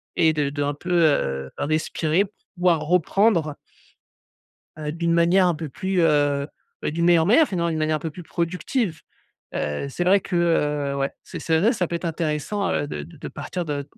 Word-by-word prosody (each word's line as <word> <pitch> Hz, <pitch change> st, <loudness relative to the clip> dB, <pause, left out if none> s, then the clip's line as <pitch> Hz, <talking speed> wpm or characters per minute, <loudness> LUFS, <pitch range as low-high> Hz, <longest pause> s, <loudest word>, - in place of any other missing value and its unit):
et 160 Hz, -1 st, +4 dB
de 150 Hz, -2 st, 0 dB
de 145 Hz, 0 st, -2 dB
un 145 Hz, 0 st, 0 dB
peu 180 Hz, +5 st, -6 dB
heu, 70 Hz, -, +2 dB
respirer 155 Hz, +4 st, 0 dB
pour 205 Hz, -, -19 dB, 0.2 s
pouvoir 175 Hz, -3 st, +2 dB
reprendre 170 Hz, 0 st, +2 dB, 1.2 s
heu, 150 Hz, -1 st, -4 dB
d'une 170 Hz, +1 st, 0 dB
manière 175 Hz, +3 st, +4 dB
un 175 Hz, -, +1 dB
peu 155 Hz, -1 st, -6 dB
plus 190 Hz, +4 st, -1 dB
heu, 145 Hz, -3 st, +2 dB, 0.4 s
d'une 170 Hz, +3 st, 0 dB
meilleure 170 Hz, -2 st, +5 dB
manière 265 Hz, -, +5 dB
finalement. 170 Hz, -3 st, -1 dB
D'une 160 Hz, -, -2 dB
manière 155 Hz, 0 st, +1 dB
un -, -, -11 dB
peu 160 Hz, +1 st, -4 dB
plus 175 Hz, +4 st, -10 dB
productive.» 175 Hz, -, -2 dB, 0.5 s
Heu, 75 Hz, -, -2 dB
c'est 175 Hz, -, -2 dB
vrai 190 Hz, +3 st, +5 dB
que 185 Hz, -, -5 dB
heu, 150 Hz, -5 st, +1 dB
ouais, 135 Hz, 0 st, -1 dB
c'est -, -, -8 dB
c'est 160 Hz, -1 st, +1 dB
vrai, 220 Hz, +9 st, +3 dB
ça 180 Hz, -7 st, -1 dB
peut 170 Hz, -, -3 dB
être 170 Hz, -, -4 dB
intéressant, 165 Hz, +5 st, -1 dB
heu, 145 Hz, -, -1 dB
de -, -, -5 dB
de 165 Hz, 0 st, -14 dB
de -, -, -7 dB
partir 180 Hz, -2 st, -5 dB
de, 145 Hz, -2 st, -3 dB
165 Hz, 200 wpm, -23 LUFS, 150-180 Hz, 1.2 s, meilleure